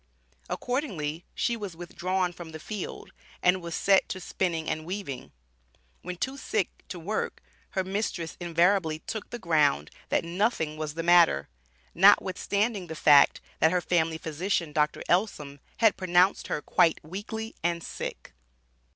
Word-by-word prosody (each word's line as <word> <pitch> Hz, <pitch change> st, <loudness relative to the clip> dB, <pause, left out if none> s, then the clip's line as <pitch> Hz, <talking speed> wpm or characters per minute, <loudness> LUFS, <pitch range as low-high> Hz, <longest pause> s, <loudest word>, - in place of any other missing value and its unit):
Accordingly, 180 Hz, -, -3 dB
she 235 Hz, -, 0 dB
was 205 Hz, -6 st, -6 dB
withdrawn 180 Hz, +1 st, -2 dB
from 165 Hz, -2 st, -10 dB
the 160 Hz, -, -7 dB
field, 205 Hz, +4 st, -6 dB, 0.3 s
and 180 Hz, +1 st, +4 dB
was 170 Hz, -1 st, -5 dB
set 195 Hz, -1 st, +3 dB
to 190 Hz, -, -4 dB
spinning 170 Hz, -3 st, -2 dB
and 155 Hz, 0 st, -2 dB
weaving. 175 Hz, -7 st, -6 dB, 0.7 s
When 180 Hz, -, -6 dB
too 265 Hz, +8 st, -3 dB
sick 215 Hz, -8 st, -1 dB, 0.2 s
to 180 Hz, -, -6 dB
work 195 Hz, +6 st, -3 dB, 0.4 s
her 190 Hz, -, +3 dB
mistress 190 Hz, -4 st, -3 dB
invariably 175 Hz, -1 st, +2 dB
took 215 Hz, +6 st, -6 dB
the 240 Hz, -, -5 dB
ground, 150 Hz, -, +2 dB, 0.2 s
that -, -, +1 dB
"nothing 170 Hz, -3 st, 0 dB
was 155 Hz, -1 st, -5 dB
the 165 Hz, -, -3 dB
matter," 175 Hz, 0 st, +5 dB, 0.4 s
notwithstanding 200 Hz, +2 st, +3 dB
the 160 Hz, -, -6 dB
fact, 145 Hz, -2 st, +6 dB, 0.2 s
that 160 Hz, -, +4 dB
her 180 Hz, -, +2 dB
family 165 Hz, -2 st, +1 dB
physician, 165 Hz, 0 st, -2 dB
Dr. 150 Hz, 0 st, +1 dB
Ellsom, 155 Hz, -7 st, 0 dB, 0.2 s
had 225 Hz, -3 st, +4 dB
pronounced 185 Hz, +1 st, +3 dB
her 150 Hz, -, -3 dB
"quite 165 Hz, -, +3 dB
weakly 215 Hz, +7 st, -6 dB
and 170 Hz, -1 st, 0 dB
sick." -, -, -6 dB
175 Hz, 145 wpm, -28 LUFS, 160-195 Hz, 0.7 s, fact